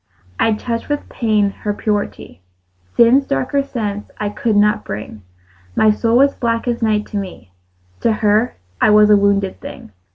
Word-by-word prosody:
I 225 - +3
touched 230 +3 -4
with 290 0 -2
pain 215 -4 +1
her 205 -1 -2
purity; 205 - -3 0.6
Sin's 255 +4 +5
darker 135 - 0
sense 210 -7 -4
I 210 - -2
could 215 +1 -1
not 210 +1 +3
bring: 105 +1 -7 0.5
My 215 - +4
soul 230 +2 +1
was 275 +2 +4
black 230 0 -2
as 240 0 -1
night 215 -2 +1
to 210 - -4
me: 185 - -7 0.5
To 230 - +1
her 215 +2 +1 0.3
I - - +5
was 210 0 +6
a - - +8
wounded 200 -1 +1
thing. - - -10
210 Hz, 165 wpm, -18 LUFS, 205-230 Hz, 0.6 s, a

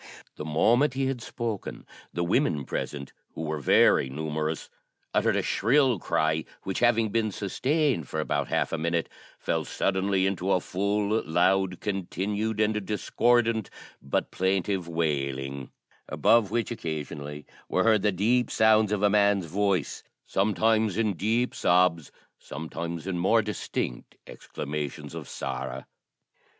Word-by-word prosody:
The 75 - -6
moment 120 - +3
he 135 0 0
had 130 -2 -2
spoken, 115 -4 -5 0.3
the 85 - -2
women 85 - +1
present, 70 -2 -5 0.2
who 80 - -4
were 75 -1 -2
very 65 -1 +4
numerous, 75 +2 -3 0.5
uttered - - +2
a - - +1
shrill 125 0 +2
cry, 80 -1 0 0.2
which, 95 - -3
having 115 -2 +3
been 110 0 0
sustained 125 - 0
for 80 - -3
about 75 - -1
half - - 0
a 80 - -1
minute, 85 +1 -1 0.3
fell - - -1
suddenly 95 0 0
into 95 0 0
a - - +3
full, 100 +4 0
loud, 90 +2 +1
continued, 105 +2 -2
and 105 -1 +1
discordant 115 +1 +1 0.3
but 70 - -2
plaintive 95 -1 0
wailing, 70 -5 -2 0.4
above 115 -4 +3
which 115 +2 -1
occasionally 75 - -5 0.2
were - - +2
heard 110 -2 +4
the 105 - +2
deep 115 +7 +1
sounds 110 -1 +4
of 105 -1 0
a 105 - +5
man's 100 -2 +3
voice, 95 -1 -1 0.2
sometimes 110 0 +1
in 110 -3 +1
deep 115 +7 0
sobs, 90 -3 +2 0.3
sometimes 80 +2 -6
in 95 -2 -2
more 110 +5 +3
distinct 105 - -4
exclamations 75 -1 -6
of - - -7
sorrow. 65 0 -5
95 Hz, 135 wpm, -27 LUFS, 80-110 Hz, 0.5 s, a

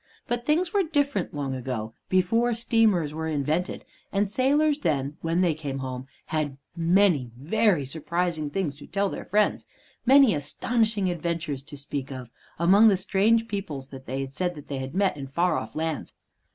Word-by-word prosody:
But 240 0 -3
things 335 +4 +2
were 405 - +4
different 285 - 0
long 140 -2 -3
ago, 125 -4 -4 0.2
before 230 +6 +2
steamers 220 -9 +2
were 160 +1 -3
invented; 155 +4 -1 0.3
and 200 0 0
sailors 290 +5 +2
then, 140 - -1
when 165 +2 +1
they 175 -3 +3
came 145 -3 -5
home, 130 -1 -5 0.2
had 150 -3 -2 0.2
many 170 -6 +3
very 180 - +2
surprising 160 +2 -2
things 155 -3 -2
to 150 - -12
tell 200 +2 0
their - - -6
friends, 210 +2 +1 0.4
many 265 -3 +6
astonishing 210 - 0
adventures 165 -4 -3
to 145 +1 -11
speak 140 -1 -5
of, 130 -3 -7 0.3
among 195 +6 +6
the 200 -3 +5
strange 210 +4 +2
peoples 160 -11 -5
that 135 -1 -11
they 135 +2 -2
said 175 +6 -3
they 140 -2 -6
had 130 +3 -6
met 195 -5 +2
in 135 -1 -6
far 170 +7 +1
off - - -4
lands. 160 -1 -3
170 Hz, 165 wpm, -26 LUFS, 140-210 Hz, 0.4 s, many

